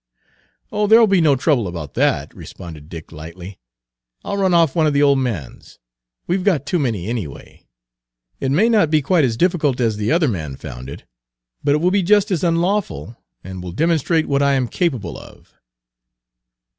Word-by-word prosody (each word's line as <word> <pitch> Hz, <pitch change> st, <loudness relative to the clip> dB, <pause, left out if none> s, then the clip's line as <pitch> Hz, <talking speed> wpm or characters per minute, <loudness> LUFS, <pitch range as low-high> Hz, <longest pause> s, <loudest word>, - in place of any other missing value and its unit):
"Oh, 210 Hz, 0 st, 0 dB
there'll 225 Hz, +2 st, +7 dB
be 195 Hz, -4 st, +3 dB
no 150 Hz, -3 st, +4 dB
trouble 130 Hz, -, +1 dB
about 85 Hz, -5 st, -7 dB
that," -, -, 0 dB
responded 80 Hz, -3 st, -11 dB
Dick 80 Hz, -2 st, -10 dB
lightly; 85 Hz, +4 st, -10 dB, 0.7 s
"I'll 200 Hz, -, -3 dB
run 190 Hz, -2 st, +2 dB
off 165 Hz, -4 st, +3 dB
one 160 Hz, -2 st, +3 dB
of 150 Hz, -, +1 dB
the 140 Hz, +1 st, +3 dB
old 140 Hz, -1 st, +4 dB
man's; 110 Hz, -, -5 dB, 0.5 s
we 175 Hz, -, 0 dB
've 185 Hz, -, -4 dB
got 180 Hz, -8 st, +1 dB
too 170 Hz, +4 st, 0 dB
many 115 Hz, -, -2 dB
anyway. 110 Hz, -, -7 dB, 0.7 s
It 135 Hz, -, -2 dB
may 175 Hz, +12 st, +3 dB
not 215 Hz, -9 st, +3 dB
be 155 Hz, -2 st, +2 dB
quite 170 Hz, +2 st, +2 dB
as 115 Hz, -3 st, -2 dB
difficult 155 Hz, -5 st, +1 dB
as 115 Hz, -4 st, 0 dB
the 105 Hz, 0 st, -1 dB
other 165 Hz, -1 st, +3 dB
man 80 Hz, -, -3 dB
found 65 Hz, 0 st, -9 dB
it, 70 Hz, -, -9 dB, 0.6 s
but 145 Hz, -, +3 dB
it 150 Hz, -, -1 dB
will 180 Hz, +2 st, +2 dB
be 200 Hz, +1 st, +2 dB
just 205 Hz, +3 st, +3 dB
as 180 Hz, -3 st, -1 dB
unlawful, 170 Hz, -, -1 dB, 0.3 s
and 95 Hz, 0 st, -8 dB
will 90 Hz, -1 st, -7 dB
demonstrate 165 Hz, -, +1 dB
what 140 Hz, 0 st, +1 dB
I 140 Hz, 0 st, +3 dB
am 130 Hz, -2 st, 0 dB
capable 120 Hz, -, -2 dB
of." -, -, -16 dB
140 Hz, 185 wpm, -19 LUFS, -, 0.7 s, there'll